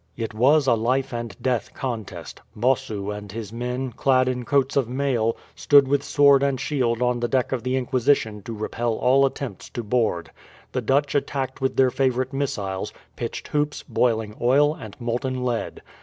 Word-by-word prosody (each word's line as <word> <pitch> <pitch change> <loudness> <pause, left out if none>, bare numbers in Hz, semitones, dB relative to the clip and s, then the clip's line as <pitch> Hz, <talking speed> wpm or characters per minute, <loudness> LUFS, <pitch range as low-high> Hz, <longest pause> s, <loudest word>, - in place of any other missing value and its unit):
It 115 -2 -4
was 135 +7 +4
a 125 - +4
life 130 +4 0
and 115 -3 -5
death 125 -3 -1
contest. 110 -10 -5
Bossu 105 -4 0
and 105 -1 -8
his 110 0 -7
men, 125 +2 -3
clad 130 +2 +2
in 125 -1 -2
coats 140 -1 +1
of 135 -5 +1
mail, 125 -4 0 0.2
stood 140 -2 +5
with 140 +1 +2
sword 140 -1 +5
and 140 -2 +1
shield 125 -5 0
on 125 0 +1
the 120 - 0
deck 130 0 0
of 130 -3 -1
the 125 +1 -1
Inquisition 125 -4 +1
to 115 - -7
repel 115 +2 -2
all 135 +4 +4
attempts 130 -8 -7
to 120 - -5
board. 105 -7 0 0.4
The 125 - -1
Dutch 135 +4 +1
attacked 135 -2 -2
with 130 - 0
their 130 -1 +4
favourite 130 0 0
missiles 100 -9 -2 0.2
pitched - - -5
hoops, 150 0 -1
boiling 115 -3 0
oil, 145 +5 +4
and 110 -8 -11
molten 125 +2 -2
lead. 120 -2 -3
125 Hz, 175 wpm, -24 LUFS, 115-135 Hz, 0.4 s, stood